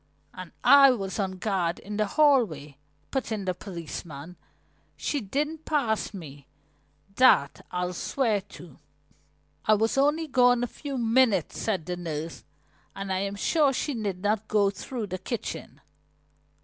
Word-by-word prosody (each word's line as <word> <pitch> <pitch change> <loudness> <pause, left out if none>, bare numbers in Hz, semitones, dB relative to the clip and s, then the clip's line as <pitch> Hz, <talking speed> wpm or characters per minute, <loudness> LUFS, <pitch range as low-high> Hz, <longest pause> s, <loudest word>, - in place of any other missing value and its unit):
"And 185 -2 -9
I 280 -1 +8
was 200 -5 -2
on 190 -2 -1
guard 185 -3 -1
in 205 +1 -7
the 215 -1 +1
hallway," 200 - +2 0.3
put 265 -3 -2
in 210 -3 -2
the 185 - 0
policeman. 170 -3 -8 0.6
"She 290 - -2
didn't 295 +9 -3
pass 245 -10 0
me, 145 -8 -10 0.7
that 250 - +4
I'll 180 0 -2
swear 220 +2 0
to." 180 -6 -14 0.9
"I 215 - +5
was 225 +5 +1
only 295 +4 +2
gone 245 -3 +4
a - - 0
few 280 +2 -6
minutes," 230 - +2
said 190 -8 -1
the 180 +1 -4
nurse. 160 -2 -5 0.5
"And 195 -1 -3
I 185 - 0
am 200 +1 -2
sure 285 +6 +2
she 290 +3 -2
did 200 -5 -4
not 215 +1 0
go 205 -2 +3
through 225 +3 -5
the 185 -1 -5
kitchen." 235 +4 -6
205 Hz, 150 wpm, -27 LUFS, 180-255 Hz, 0.9 s, I